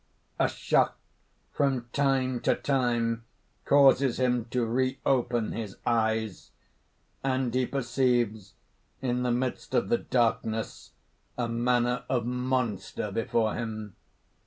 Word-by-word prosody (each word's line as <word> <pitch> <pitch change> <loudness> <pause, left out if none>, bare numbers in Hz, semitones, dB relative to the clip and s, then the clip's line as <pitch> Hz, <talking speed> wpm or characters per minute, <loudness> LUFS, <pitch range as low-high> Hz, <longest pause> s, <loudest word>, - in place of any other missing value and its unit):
A - - +4
shock - - +1 0.5
from 135 -4 0
time 135 -3 +1
to - - +2
time 120 -4 0 0.4
causes 135 -3 +5
him 125 -2 +1
to 125 0 -1
reopen 125 -1 0
his 105 -4 -5
eyes; 110 -3 0 0.7
and 130 -2 0
he 130 -1 +1
perceives 120 -6 0 0.5
in 125 -1 0
the 125 -1 +1
midst 125 +1 -2
of 120 - +1
the 235 0 +3
darkness 115 -2 -1 0.4
a 120 -1 0
manner 120 +1 +1
of 120 -3 0
monster 125 -5 -2
before 110 +1 0
him. 110 -3 -5
120 Hz, 110 wpm, -28 LUFS, 115-130 Hz, 0.7 s, causes